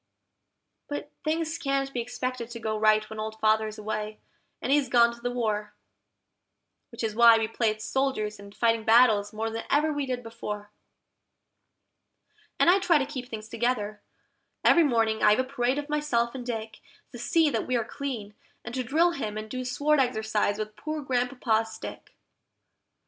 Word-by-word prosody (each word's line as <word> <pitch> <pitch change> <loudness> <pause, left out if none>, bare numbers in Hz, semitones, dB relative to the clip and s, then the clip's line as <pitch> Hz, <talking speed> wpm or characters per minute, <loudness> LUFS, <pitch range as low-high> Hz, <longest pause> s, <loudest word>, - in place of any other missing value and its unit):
But 290 0 -5
things 320 +1 -1
can't 275 -1 -1
be 240 - -1
expected 245 0 -4
to 235 -1 -7
go 220 -1 -2
right 215 0 +3
when 220 - -8
Old 220 0 -5
Father's 215 0 +2
away, 215 0 -4 0.4
and - - -2
he's 285 -3 +3
gone 235 -1 +5
to 235 - -14
the 245 - -1
war; 215 -4 -2 1.1
Which 235 -1 -7
is 220 -1 -1
why 230 0 +7
we 225 -1 0
play 225 0 +1
at 215 0 -4
soldiers 230 -4 -1
and 200 0 -12
fighting 230 -1 +2
battles 220 -3 +5
more 225 +1 -3
than 225 0 -4
ever 305 +2 +2
we 290 -2 -2
did 250 -1 -3
before. 210 -2 -6 1.9
And - - +4
I 365 +3 +6
try 345 -4 +4
to 275 - 0
keep 260 -3 -7
things 215 -1 -7
together: 225 -2 -2 0.6
every 340 - +6
morning 225 -6 +1
I - - +6
have - - -3
a - - +3
parade 260 0 -1
of 290 0 -3
myself 295 -6 0
and 260 -2 -6
Dick, 225 -3 -5 0.3
To 240 - -9
see 315 +5 +2
that - - -2
we 255 - 0
are 230 - -1
clean, 235 -6 -5 0.3
and 240 - -6
to 255 0 -1
drill 320 +8 +3
him 215 -10 -4
and 215 0 -6
do 255 0 -3
sword 290 +4 +1
exercise 220 -5 +1
with 215 0 -5
poor 310 0 -4
Grandpapa's 245 -4 0
stick. - - -9
235 Hz, 180 wpm, -27 LUFS, 220-270 Hz, 1.9 s, why